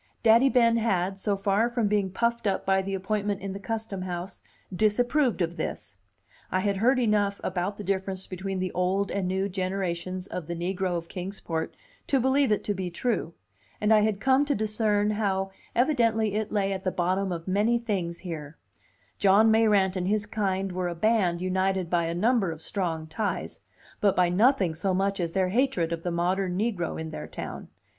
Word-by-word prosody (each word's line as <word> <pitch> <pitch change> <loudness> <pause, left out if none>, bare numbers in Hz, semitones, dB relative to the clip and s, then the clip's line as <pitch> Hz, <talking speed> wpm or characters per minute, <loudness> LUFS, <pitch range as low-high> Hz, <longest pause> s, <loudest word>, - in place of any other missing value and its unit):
Daddy 230 +4 +6
Ben 230 -3 +4
had, 195 -4 0
so 200 0 0
far 200 +4 +2
from 235 -3 0
being 205 -2 +1
puffed 235 +3 0
up 195 - -1
by 190 0 +3
the 195 0 -3
appointment 205 +1 -1
in 195 0 -4
the 195 - -6
Custom 220 -2 -4
House, 180 +1 -5 0.3
disapproved 240 +3 +2
of 170 +1 -3
this. - - -5 0.5
I 185 - +1
had 200 0 0
heard 250 +6 +3
enough 210 -4 +1
about 185 +2 -2
the 210 - -6
difference 190 -1 -2
between 190 +1 -4
the 185 0 -2
old 190 +2 0
and 195 -2 -1
new 190 +1 0
generations 185 -1 -3
of 180 -5 -6
the 170 - -3
negro 180 +1 -1
of 165 0 -6
Kings 190 +2 -6
Port 160 -1 -3 0.3
to 270 - +2
believe 265 0 +2
it 210 - +1
to 205 - -1
be 185 -2 -3
true, 175 -3 -2 0.4
and 210 +1 +3
I 215 - +6
had 210 -1 +1
come 265 +4 +3
to 285 - 0
discern 210 -1 +1
how 195 -2 -1 0.2
evidently 230 -5 +2
it 215 0 -2
lay 195 -2 +1
at 190 0 -5
the 185 - +1
bottom 185 +2 0
of 170 0 -5
many 210 +5 +2
things 190 -8 -2
here: 160 -4 -7 0.6
John 205 +3 +5
Mayrant 210 -4 +3
and 180 -1 -1
his 210 +1 +1
kind 195 -2 -1
were 180 0 -2
a 175 - -3
band 185 -3 +2
united 185 -1 0
by 170 -1 +2
a 165 - -2
number 215 0 +2
of 160 0 -8
strong 165 -5 -2
ties, 180 +7 -3 0.4
but 200 -2 +3
by 180 -1 +3
nothing 195 - +3
so 185 +4 -1
much 195 +1 0
as 170 -2 -1
by 190 - +2
their 185 - +1
hatred 195 -7 +1
of 165 - -4
the 175 - -2
modern 180 +2 0
negro 200 -7 -1
in 160 0 -5
their - - -6
town. - - -7
195 Hz, 195 wpm, -27 LUFS, 180-215 Hz, 0.6 s, Daddy